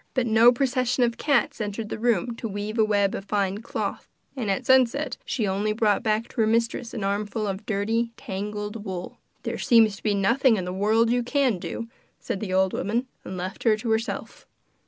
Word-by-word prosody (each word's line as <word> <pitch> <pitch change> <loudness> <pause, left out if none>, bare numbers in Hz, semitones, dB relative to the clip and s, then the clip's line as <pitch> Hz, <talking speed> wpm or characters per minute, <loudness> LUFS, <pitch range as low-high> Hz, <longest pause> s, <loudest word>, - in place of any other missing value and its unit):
But 255 -2 +2
no 225 +1 +6
procession 255 0 +1
of 235 -1 0
cats 285 -2 +1
entered 210 +1 -4
the - - -4
room 235 0 +1
to 230 - -4
weave 210 +2 -4
a - - +6
web 205 -2 +2
of 195 - -5
fine 200 -1 0
cloth, 230 - -4 0.3
and 240 -6 -3
at 195 - -1
sunset 260 +2 +3
she 230 - -1
only 205 +3 0
brought 215 -2 +2
back 220 +1 0
to - - -2
her 220 - +3
mistress 230 +1 0
an 215 - -3
armful 205 +2 -1
of 200 +1 -4
dirty, 225 +3 0
tangled 210 -1 -5
wool. 185 -3 -6 0.2
'There - - -3
seems 220 -4 +4
nothing 220 +4 +3
in 185 - -3
the 180 - -4
world 220 +4 +2
you 245 0 +2
can 245 -4 +1
do,' 230 - -5 0.3
said 195 - -4
the 195 -3 -4
old 190 0 +2
woman, 235 +5 -1 0.2
and 185 - -6
left 185 +1 -5
her 220 -2 +3
to 225 +1 -3
herself. 220 +2 -3
220 Hz, 200 wpm, -25 LUFS, 200-235 Hz, 0.3 s, no